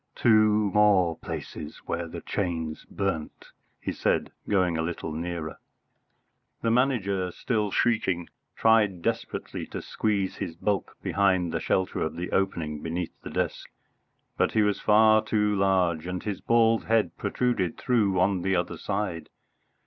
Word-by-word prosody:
"Two 110 -2 +4
more 100 -5 +4
places 75 +1 -7
where 85 0 -3
the - - -7
chains 80 -5 -3
burnt," 95 -6 -4 0.3
he - - -3
said, - - 0 0.2
going 90 -4 +2
a 80 - 0
little 80 -1 -4
nearer. 85 -1 -4 1.0
The 115 - +2
Manager, 105 -7 +1
still 105 +1 -1
shrieking, 95 -6 +1 0.3
tried 105 -6 +3
desperately - - -3
to - - -5
squeeze 100 -3 -1
his 90 -5 -4
bulk 100 +3 -2
behind 95 -4 +2
the - - -1
shelter 95 -1 0
of 80 - -2
the 90 +1 -4
opening 80 -6 -1
beneath 85 +1 -3
the - - -7
desk, - - -2 0.7
but - - +1
he 110 - +4
was 105 -1 +1
far 110 0 +5
too 105 -1 +1
large, 90 -4 +1
and 90 0 -4
his 105 -3 -4
bald 115 -1 +3
head 115 -1 +2
protruded 120 -9 -1
through 105 -7 +1
on 95 0 +2
the 95 +1 +1
other 85 - -2
side. 100 -5 -3
95 Hz, 145 wpm, -27 LUFS, 85-105 Hz, 1.0 s, far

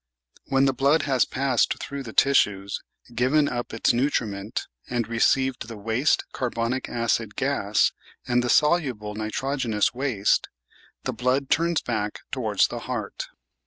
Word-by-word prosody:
When 135 0 +3
the 135 - +2
blood 140 +5 +3
has 135 -4 +2
passed 130 -2 +1
through 140 0 -6
the 120 -4 -7
tissues 105 -7 +2
— - - -56
given 135 +5 +3
up 120 -2 -3
its 115 - +2
nutriment 110 -6 -1 0.2
and 120 -2 -1
received 125 +1 +1
the 115 -2 -8
waste 115 +7 +1
carbonic 125 0 -2
acid 115 -2 -1
gas 130 -7 +1 0.4
and 120 -1 +2
the 125 - -1
soluble 130 -9 +2
nitrogenous 110 +1 -1
waste 125 -6 +1 0.3
— - - -30
^the - - -2
blood 130 +2 0
turns 170 0 +2
back 105 -3 -2
towards - - +2
the - - -5
heart. - - -5
125 Hz, 145 wpm, -25 LUFS, 110-135 Hz, 0.4 s, When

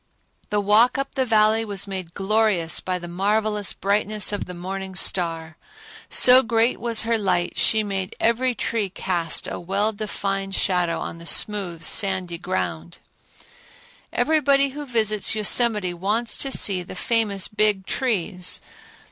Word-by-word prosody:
The 210 - 0
walk 215 +5 +3
up 275 0 -4
the 260 -2 -1
Valley 220 0 +3
was 200 -3 -2
made 185 -3 -6
glorious 195 -4 +1
by 185 -1 -3
the 175 -1 -8
marvelous 210 +3 -1
brightness 205 +1 0
of 205 - -3
the 180 - -9
morning 190 +2 -6
star. 165 -4 0 0.5
So 255 +1 +7
great 230 0 0
was 230 -2 +1
her 230 0 0
light, 185 -3 -1
she 220 -1 +3
made 195 -1 -4
every 245 +2 +1
tree 220 -4 -2
cast 175 -3 -1
a - - -5
well 195 +5 -1
defined 195 -2 -4
shadow 180 -3 0
on 165 - -7
the 170 - -9
smooth 185 -6 +2
sandy 185 -1 0
ground. 85 - -4 1.1
Everybody 280 0 +2
who 290 +2 -8
visits 215 -3 0
Yosemite 210 -3 +2
wants 210 +7 -1
to 270 - -1
see 190 -7 +2
the 175 - -10
famous 205 -2 0
Big 210 -2 0
Trees. 190 -8 -1
205 Hz, 145 wpm, -22 LUFS, 185-225 Hz, 1.1 s, So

